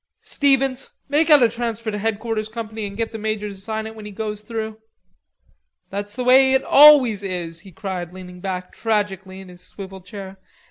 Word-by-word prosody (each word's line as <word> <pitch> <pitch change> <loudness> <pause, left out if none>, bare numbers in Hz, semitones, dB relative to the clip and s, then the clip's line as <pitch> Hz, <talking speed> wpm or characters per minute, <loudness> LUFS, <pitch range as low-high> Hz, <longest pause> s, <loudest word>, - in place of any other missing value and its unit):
Stevens, 270 -2 +1 0.2
make 305 +3 +2
out 295 -4 +8
a - - +7
transfer 230 -1 -3
to 210 - -3
headquarters 220 0 -2
company 220 -1 -5
and 200 0 -9
get 230 0 -2
the 225 - -6
major 215 -1 -2
to 200 - -9
sign 220 +3 -4
it 220 - -7
when 215 -1 -10
he - - -8
goes 210 0 -4
through.... 220 0 -5 1.1
That's 205 +1 -4
the 250 - -2
way 265 +1 +6
it 265 - +3
always 275 -8 +7
is," 175 -4 -4
he 190 +2 -13
cried, 180 -3 -5
leaning 180 -1 -10
back 185 -1 -4
tragically 195 -4 -2
in 190 - -12
his 180 0 -14
swivel 190 +1 -9
chair. 190 +1 -10
215 Hz, 190 wpm, -21 LUFS, 190-230 Hz, 1.1 s, out